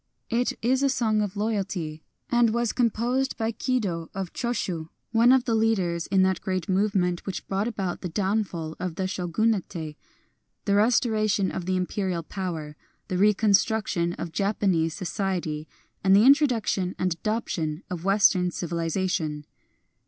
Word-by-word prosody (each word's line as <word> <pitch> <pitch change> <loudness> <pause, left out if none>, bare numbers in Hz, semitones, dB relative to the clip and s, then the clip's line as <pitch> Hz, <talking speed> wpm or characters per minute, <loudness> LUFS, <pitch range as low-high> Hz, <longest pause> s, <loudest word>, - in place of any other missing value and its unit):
It 240 +2 +1
is 255 +3 +2
a 280 - +3
song 220 -5 +1
of 205 -1 -3
loyalty, 195 -7 -2 0.3
and 240 -1 +4
was 235 -1 0
composed 245 +2 0
by 225 0 0
Kido 205 -9 -2
of 190 -3 -4
Cho 240 - -2
shii, 175 -9 -3 0.2
one 230 +2 +5
of 260 -1 +4
the 235 - 0
leaders 190 -7 +1
in 190 -1 +3
that 190 0 +1
great 185 -3 -2
move 200 +2 +1
ment 180 -2 +1
which 195 - -5
brought 195 +3 -1
about 195 -6 -3
the 180 - -4
downfall 190 -4 -1
of 180 -3 -3
the 190 - -2
Shogunate, 190 +3 0 1.0
the 200 - +2
restoration 215 -2 +2
of 180 - -5
the 185 - +1
Imperial 185 -1 -2
power, 165 -6 -5 0.3
the 185 - -1
reconstruction 205 -3 +2
of 170 -1 -6
Japanese 190 -5 +1
society, 175 -4 -3 0.4
and 190 0 +5
the 210 +3 +6
introduction 245 -10 +3
and 185 -2 0
adoption 170 -6 -2
of 175 -2 -4
Western 195 -2 +4
civilization. 165 -3 -2
195 Hz, 150 wpm, -26 LUFS, 175-220 Hz, 1.0 s, the